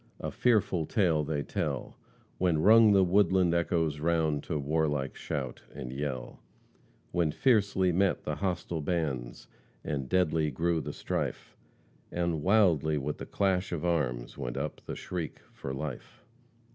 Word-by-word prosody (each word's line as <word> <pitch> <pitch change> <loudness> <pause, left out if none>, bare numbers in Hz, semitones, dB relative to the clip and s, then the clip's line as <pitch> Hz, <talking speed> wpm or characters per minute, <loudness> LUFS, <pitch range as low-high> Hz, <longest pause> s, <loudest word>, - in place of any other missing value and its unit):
A - - -4
fearful 105 -9 +2
tale 85 -7 +2
they 75 -1 -2
tell, - - -3 0.4
When 90 -3 +2
rung 110 +1 +7
the 95 -1 +5
woodland 95 -1 +3
echoes 85 -3 0
round 80 -2 +1
To 80 - -2
warlike 75 -1 0
shout 65 -3 -4
and 60 0 -6
yell, 65 -2 -4 0.7
When 85 -3 +1
fiercely 100 - +2
met 95 +2 +1
the - - -3
hostile 90 -4 -2
bands, 70 -7 -3 0.4
And 70 -3 -3
deadly 80 -4 +2
grew 80 +3 0
the - - -5
strife, - - -4 0.6
And 85 -3 -1
wildly, 85 -6 +3
with 75 +1 -3
the - - -6
clash 95 -2 0
of 85 -1 -3
arms, 65 -8 -1
Went 65 -2 -4
up 75 +2 -4
the - - -4
shriek 85 -4 -5 0.2
for 65 - -6
life." 65 0 -6
80 Hz, 145 wpm, -30 LUFS, 75-90 Hz, 0.7 s, rung